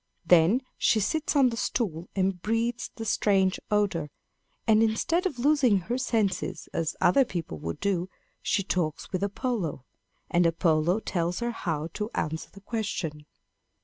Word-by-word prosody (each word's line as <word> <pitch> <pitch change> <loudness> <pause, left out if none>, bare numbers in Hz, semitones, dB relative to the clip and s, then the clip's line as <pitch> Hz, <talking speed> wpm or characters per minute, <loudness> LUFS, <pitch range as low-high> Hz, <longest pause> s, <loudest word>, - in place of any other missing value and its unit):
Then 175 +9 +5 0.2
she 220 - +3
sits 315 +10 0
on 270 -3 +5
the 230 - -5
stool 185 -9 -2
and 190 -2 0
breathes 230 +4 -1
the 225 - -6
strange 195 -3 +2
odor; 195 -7 +1 0.6
and 220 -1 +5
instead 330 - +2
of 300 - -6
losing 265 -4 +4
her 240 +8 -2
senses 225 -6 -1
as 165 -2 -1
other 225 +10 +5
people 165 - -5
would 80 +2 -5
do, 185 -2 0 0.3
she 200 - +1
talks 170 -5 -2
with 185 -1 -1
Apollo; 200 - -2 0.4
and 175 0 +3
Apollo 165 +3 +2
tells 175 -2 -1
her 240 0 -1
how 165 -8 -3
to 210 0 -3
answer 160 +1 -2
the 200 - -15
question. 185 -9 -4
200 Hz, 150 wpm, -27 LUFS, 170-230 Hz, 0.6 s, Then